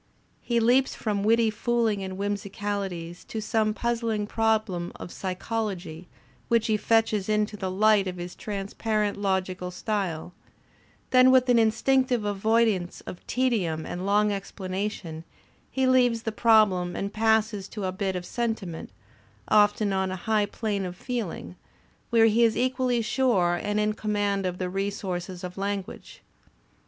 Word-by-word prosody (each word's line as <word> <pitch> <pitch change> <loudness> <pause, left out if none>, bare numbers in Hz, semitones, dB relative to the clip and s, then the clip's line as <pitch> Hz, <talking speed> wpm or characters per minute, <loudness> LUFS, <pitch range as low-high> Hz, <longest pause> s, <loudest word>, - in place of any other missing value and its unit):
He 235 -1 0
leaps 250 +4 +3
from 205 -3 -2
witty 225 +1 +3
fooling 225 -2 0
and 190 0 -5
whimsicalities 200 -3 -4
to 220 - -5
some 215 0 0
puzzling 230 -3 -1
problem 215 -5 0
of 175 - -8
psychology 185 -3 -4 0.4
which 230 -2 +2
he 220 - +2
fetches 215 -1 +1
into 210 0 +1
the 190 -2 -3
light 205 +1 +3
of 180 -1 -4
his 175 0 -6
transparent 210 +1 -2
logical 190 -2 -1
style; 180 -3 -3 0.8
then 255 0 +7
with 260 -1 +4
an 245 - +5
instinc 255 +4 +3
tive 240 -5 0
avoidance 205 -2 +1
of 180 - -9
tedium 200 -12 0
and 180 - -5
long 205 +2 +3
explanation, 190 -4 -4 0.5
he 265 -1 0
leaves 245 -3 +3
the 225 - -2
problem 210 -6 +3
and 200 +1 -3
passes 220 -2 +1
to 210 0 -6
a 185 - -1
bit 190 0 -2
of 180 -1 -4
sentiment, 220 -9 -3 0.6
often 205 -1 +4
on 190 0 0
a 185 - -3
high 215 -2 +2
plane 205 -2 -2
of 180 -1 -5
feeling, 220 -6 -5 0.5
where 230 -2 +5
he 225 +1 +4
is 225 -1 +3
equally 255 -2 +1
sure 215 -8 +2
and 205 0 -1
in 210 0 +1
command 205 -2 -1
of 180 0 -4
the 185 - -2
resources 190 -1 -4
of 180 +1 -6
language. 200 -1 -5
210 Hz, 145 wpm, -26 LUFS, 190-225 Hz, 0.8 s, then